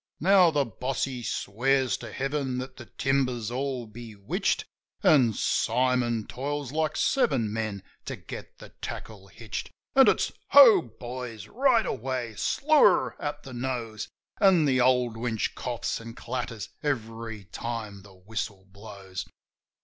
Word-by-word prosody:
Now 185 Hz, 0 st, +6 dB
the 145 Hz, -3 st, +1 dB
boss 125 Hz, +4 st, -3 dB
he 130 Hz, -3 st, -3 dB
swears 130 Hz, +5 st, 0 dB
to -, -, -9 dB
heaven 135 Hz, -1 st, -2 dB
that 130 Hz, +1 st, -6 dB
the 120 Hz, -, -10 dB
timber's 130 Hz, -4 st, 0 dB
all 130 Hz, -1 st, -2 dB
bewitched, 110 Hz, -2 st, -3 dB, 0.4 s
An' 130 Hz, -7 st, +6 dB
Simon 125 Hz, -1 st, +1 dB
toils 145 Hz, 0 st, -4 dB
like 155 Hz, 0 st, 0 dB
seven 130 Hz, -, +2 dB
men 110 Hz, -4 st, -3 dB, 0.2 s
to -, -, -4 dB
get -, -, -10 dB
the -, -, -12 dB
tackle 100 Hz, -3 st, -7 dB
hitched. 110 Hz, +2 st, -6 dB, 0.3 s
An' 270 Hz, 0 st, +8 dB
it's: -, -, +3 dB, 0.2 s
Ho, 240 Hz, -9 st, +10 dB, 0.2 s
boys! 120 Hz, -2 st, -6 dB
Right 250 Hz, -2 st, +3 dB
away! 125 Hz, -2 st, -3 dB
Slew 305 Hz, -, +2 dB
her 190 Hz, -, +4 dB
at 145 Hz, 0 st, -4 dB
the 130 Hz, -, -9 dB
nose! 120 Hz, -4 st, -3 dB, 0.3 s
An' 185 Hz, -5 st, +5 dB
the 130 Hz, -3 st, +3 dB
old 125 Hz, -2 st, +3 dB
winch 115 Hz, -2 st, -1 dB
coughs 120 Hz, -2 st, -3 dB
an' 115 Hz, 0 st, -9 dB
clatters 120 Hz, -3 st, -5 dB
every 115 Hz, -6 st, -3 dB
time 105 Hz, +1 st, -5 dB
the 100 Hz, -1 st, -16 dB
whistle 100 Hz, 0 st, -5 dB
blows. 100 Hz, -2 st, -8 dB
125 Hz, 140 wpm, -27 LUFS, 110-135 Hz, 0.4 s, Ho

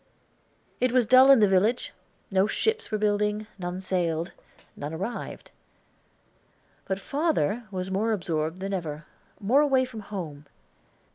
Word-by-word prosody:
It 250 Hz, -1 st, +2 dB
was 250 Hz, -1 st, +3 dB
dull 255 Hz, +4 st, +7 dB
in 270 Hz, -5 st, +8 dB
the 210 Hz, -, +6 dB
village, 200 Hz, +6 st, +1 dB, 0.4 s
no 190 Hz, +1 st, +3 dB
ships 445 Hz, -, -1 dB
were 215 Hz, -, 0 dB
building, 210 Hz, 0 st, 0 dB
none 180 Hz, 0 st, -4 dB
sailed, 175 Hz, -2 st, -1 dB, 0.4 s
none 150 Hz, +3 st, -5 dB
arrived. 195 Hz, +8 st, -6 dB, 1.3 s
But 190 Hz, 0 st, -2 dB
father 245 Hz, -, 0 dB
was 190 Hz, -1 st, -4 dB
more 215 Hz, +4 st, +1 dB
absorbed 170 Hz, -3 st, -2 dB
than 195 Hz, +1 st, -3 dB
ever, 160 Hz, -4 st, -4 dB, 0.3 s
more 235 Hz, +8 st, +4 dB
away 270 Hz, -3 st, +3 dB
from 245 Hz, -3 st, -9 dB
home. 165 Hz, -9 st, -7 dB
200 Hz, 135 wpm, -27 LUFS, 180-240 Hz, 1.3 s, in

